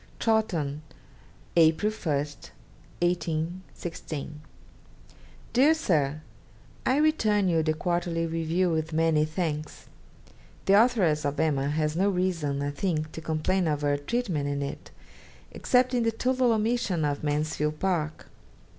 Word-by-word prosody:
'Chawton, 170 -11 0 0.7
April 165 +5 +4
1, 165 -8 -2 0.9
1816. 165 -2 -4 1.1
'DEAR 275 +6 +5
SIR, 155 - 0 0.7
I 260 - +3
return 220 -10 +2
you 165 -2 +2
the 155 0 0
"Quarterly 170 0 -1
Review" 165 +2 0
with 160 0 -2
many 160 -1 +3
thanks. 155 -2 -4 0.8
The 195 - +4
Authoress 180 -12 +1
of 145 0 -2
"Emma" 140 -3 +1
has 150 +1 0
no 195 +4 +2
reason, 170 -7 -1
I 145 - -1
think, 155 -1 -2
to 160 - -7
complain 165 +4 0
of 150 -2 0
her 145 -1 +2
treatment 160 -2 -2
in 140 0 -2
it, 140 - -6 0.6
except 255 0 +2
in 245 - +2
the 230 0 +2
total 255 +2 +1
omission 220 -7 0
of 145 0 -2
"Mansfield 150 0 -1
Park." 160 -5 -1
165 Hz, 125 wpm, -27 LUFS, 150-195 Hz, 1.1 s, DEAR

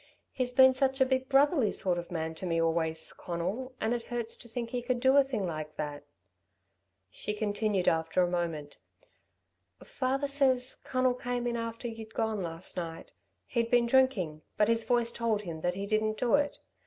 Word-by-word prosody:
He's 250 -1 -1
been 260 +1 +7
such 265 +1 +1
a 265 - +5
big 260 0 0
brotherly 275 - +4
sort 180 -2 0
of 170 - -8
man 160 -2 -3
to 180 +3 -5
me 165 -1 +1
always, 160 -1 +1
Conal, 195 +10 -4
and 220 +2 0
it 235 -1 -4
hurts 235 -2 -3
to 235 - -10
think 235 0 -4
he 250 -1 -2
could 245 0 -1
do 265 +2 +4
a 280 - +7
thing 250 -7 -3
like 155 -3 -5
that." 145 -1 -5 1.1
She 210 - -4
continued 205 -2 0
after 165 +3 +2
a - - +2
moment. 165 -5 -3 1.0
"Father 270 +2 -1
says, 265 -2 +2
Conal 255 -1 +1
came 245 0 -3
in 240 -1 -1
after 230 +1 -4
you'd 225 -1 -8
gone 220 -2 0
last 170 0 -2
night. 165 -2 -5 0.3
He'd 235 -1 -1
been 240 -1 +4
drinking, 235 -12 +2 0.2
but 210 +1 +3
his 230 -1 +2
voice 240 -2 +1
told 225 -3 -1
him 165 -4 -6
that 175 +1 0
he 195 +1 -3
didn't 215 +1 0
do 240 0 0
it. 290 0 +2
225 Hz, 190 wpm, -30 LUFS, 175-255 Hz, 1.1 s, been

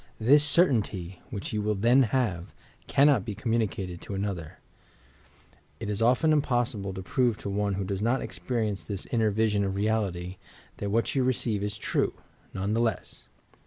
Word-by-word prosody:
This 140 +6 +5
certaiuty, 110 - +2
which 105 -5 -5
you 105 - 0
will 105 0 0
then 120 +7 +4
have, 105 -8 -1 0.3
cannot 140 -6 +4
be 105 - -5
communicated 105 -6 -2
to 100 - -6
another; 95 -5 -4 1.2
it 105 -2 -3
is 105 - -2
often 125 +7 +4
impossible 120 -8 0
to 95 - -6
prove 120 +2 +1
to 100 - -5
one 100 0 0
who 100 - -2
does 95 0 -3
not 120 +4 +2
ex - - -8
perience 110 -5 -2
this 100 -2 -5
inner 115 -3 +2
vision 105 -1 +1
of 95 -1 -2
reality 100 -4 -1 0.4
that 100 - -3
what 115 +3 +1
you 135 - +2
re 130 +1 +3
ceive 110 -4 -1
M 105 - -1
true, 105 - -1 0.4
none 100 +3 -2
the 115 - +1
le.s.s! 115 -2 -3
105 Hz, 175 wpm, -27 LUFS, 100-120 Hz, 1.2 s, This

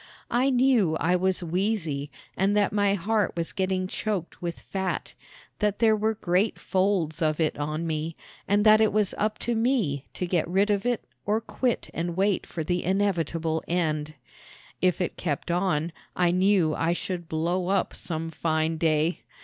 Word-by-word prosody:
I 250 +3 +3
knew 245 -10 +3
I 180 +3 +2
was 185 0 +1
wheezy 170 -5 -1 0.3
and 200 +2 +2
that 205 -1 +2
my 205 -1 +3
heart 210 +3 0
was 165 -1 -2
getting 185 -1 0
choked 190 -2 -3
with 170 -1 -4
fat; 190 -1 -3 0.5
that 210 -2 +1
there 220 -1 +4
were 220 +1 0
great 190 +2 +1
folds 185 -5 0
of 155 -1 +1
it 160 -2 +1
on 155 +3 -2
me, 160 0 -2 0.3
and 205 +1 +2
that 215 0 +7
it 220 - +4
was 210 -2 +1
up 215 0 0
to 240 - +1
me 225 - +1
to 180 - -2
get 175 -2 0
rid 195 +4 +2
of 205 +3 0
it 245 -2 0 0.2
or 210 +2 +1
quit 240 +1 -2
and 170 +1 -3
wait 195 0 +1
for 165 - -4
the 175 +3 -1
inevitable 165 -4 0
end. 155 -3 -1 0.7
If 185 -1 +2
it 180 - -2
kept 155 0 -2
on 170 -3 0 0.2
I 175 -1 +3
knew 185 -3 +3
I 165 +2 +1
should 175 -1 -4
blow 175 +3 0
up 195 +1 +1
some 165 -1 -4
fine 160 0 0
day. 160 +1 +1
180 Hz, 175 wpm, -26 LUFS, 165-205 Hz, 0.7 s, that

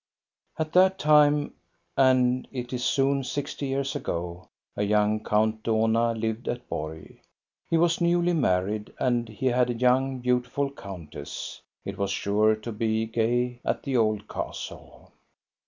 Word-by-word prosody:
At 155 -1 -3
that 190 +1 +5
time, 150 -1 +4 0.4
and 130 -1 +3
it 125 -1 -5
is 125 -1 -2
soon 135 +1 +2
sixty 145 +2 -4
years 135 +1 -2
ago, 85 -8 -4 0.3
a - - -2
young 105 +1 +2
Count 110 +1 +1
Dohna 115 +1 +2
lived 110 +1 -3
at 120 0 -3
Borg; 80 0 -6 0.5
he 165 - +3
was 170 +1 +2
newly 175 +1 +3
married, 105 - 0
and 120 -3 +1
he 110 +4 -6
had 125 -1 +3
a 120 - -1
young, 130 +2 +2
beautiful 125 +3 0
countess. 85 - -8 0.2
It - - -6
was 100 -1 0
sure 105 +2 +2
to 110 +2 -7
be 110 0 0
gay 120 +2 0
at - - -1
the 135 -2 -2
old 110 -3 +1
castle. - - -7
120 Hz, 145 wpm, -26 LUFS, 110-135 Hz, 0.5 s, that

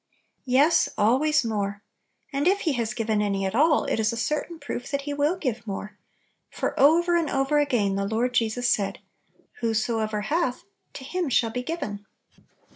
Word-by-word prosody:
\7ES, 280 +6 +4
always 270 +7 +3
more! 205 -2 -2 0.5
And 280 +4 +1
if 400 +2 +3
He 315 - 0
haa 240 -3 -1
I - - -4
given 220 -2 0
any 200 -2 0
at 190 - -2
all, 300 +5 +4
it - - -1
is 220 0 +2
a 230 - -5
certain 300 +7 -2
proof 285 -4 -6
that 280 0 -1
He 290 0 -3
will 295 +5 +1
give 240 -8 -3
more; 205 +1 -5 0.5
for - - -3
over 340 +5 +5
and 335 -3 +1
over 270 +2 +1
again 225 -9 +1
the 200 0 -1
Lord 235 +4 0
Jesus 240 +1 +1
said, 200 -4 0 0.6
"Whosoever 220 -2 -1
hath, 270 +2 -1 0.3
to - - -8
him 350 +3 -2
shall 230 -2 +2
be 250 - -3
giv 330 +7 -4
en." 205 0 -6
245 Hz, 185 wpm, -25 LUFS, 215-295 Hz, 0.6 s, over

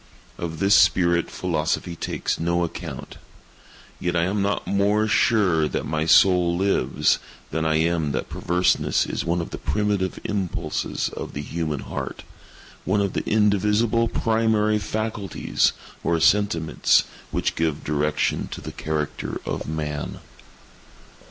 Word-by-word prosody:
Of 80 -2 -4
this 100 +3 +3
spirit 85 -4 +4
philosophy 85 0 -2
takes - - -3
no 85 +1 +1
account. 85 - -6 0.8
Yet 90 0 -1
I 85 - +2
am 100 +3 0
not 100 0 -1
more 100 +2 +2
sure 95 -8 +3
that - - -3
my 80 0 -1
soul 90 -1 +5
lives, 100 +2 +2 0.3
than 80 +1 -1
I 80 0 +2
am 80 -1 +1
that 65 - -2
perverseness 90 +1 +1
is - - -3
one 85 +1 0
of 85 - -7
the - - -6
primitive 105 -3 -1
impulses 100 -4 -2
of - - -7
the 70 - -4
human 75 -2 -3
heart—one 100 +3 -6
of 100 -2 0
the - - -1
indivisible 105 +2 +2
primary 110 -2 +1
faculties, 110 -1 -1 0.3
or 85 -1 +1
sentiments, 85 -3 +3 0.3
which - - -1
give 80 -2 -1
direction 75 0 0
to - - -6
the - - -7
character 75 -1 -3
of - - -4
Man. 75 -1 -4
90 Hz, 130 wpm, -23 LUFS, 80-105 Hz, 0.8 s, soul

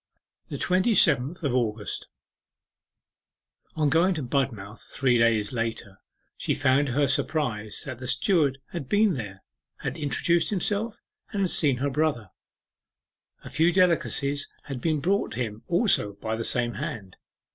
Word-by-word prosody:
THE - - -4
TWENTY 185 +5 +2
SEVENTH 135 +4 +4
OF 140 -4 0
AUGUST 110 -4 -2 1.7
On 155 -2 +1
going 170 +5 +3
to 155 - -3
Budmouth 120 -6 -2
three 125 -3 +2
days 115 -1 +2
later, 115 -4 -4 0.4
she - - -1
found 140 +1 +2
to - - -3
her 145 +1 +2
surprise 130 -7 -1
that 130 -4 -7
the 130 - -7
steward 140 +1 +2
had 140 -7 -6
been 210 -1 +3
there, 100 -7 -7 0.4
had 135 +2 -4
introduced 165 +3 +1
himself, 210 +2 -1 0.3
and 200 - -3
had 185 - +1
seen 140 -5 +3
her 140 +2 -1
brother. 135 -9 -1 1.1
A - - -10
few 165 +2 +3
delicacies 155 -5 +1 0.2
had 135 -4 -6
been 155 -3 0
brought 195 - 0
him 115 -3 -4
also 175 - +2
by 110 +3 -4
the 115 - -4
same 120 0 +1
hand. 100 -2 -6
140 Hz, 145 wpm, -26 LUFS, 115-165 Hz, 1.7 s, SEVENTH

